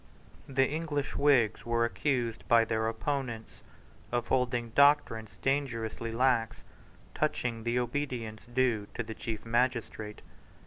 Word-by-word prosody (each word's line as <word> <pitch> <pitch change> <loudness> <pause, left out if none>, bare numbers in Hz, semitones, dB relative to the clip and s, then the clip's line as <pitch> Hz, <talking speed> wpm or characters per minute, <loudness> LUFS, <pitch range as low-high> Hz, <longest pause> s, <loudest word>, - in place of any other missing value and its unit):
The 135 0 +3
English 150 -2 -2
Whigs 130 -7 +3
were 115 0 +1
accused 120 -2 -1
by 115 -1 +5
their 110 0 0
opponents 115 0 -4 0.5
of 120 -1 -1
holding 120 -2 +1
doctrines 140 -5 +3
dangerously 115 -5 -1
lax 120 -1 +1 0.5
touching 115 -2 -1
the 120 +1 +1
obedience 120 -3 -3
due 120 -4 +1
to 115 - -2
the 110 0 -6
chief 110 0 -5
magistrate. 115 -3 -1
120 Hz, 120 wpm, -30 LUFS, 115-130 Hz, 0.5 s, by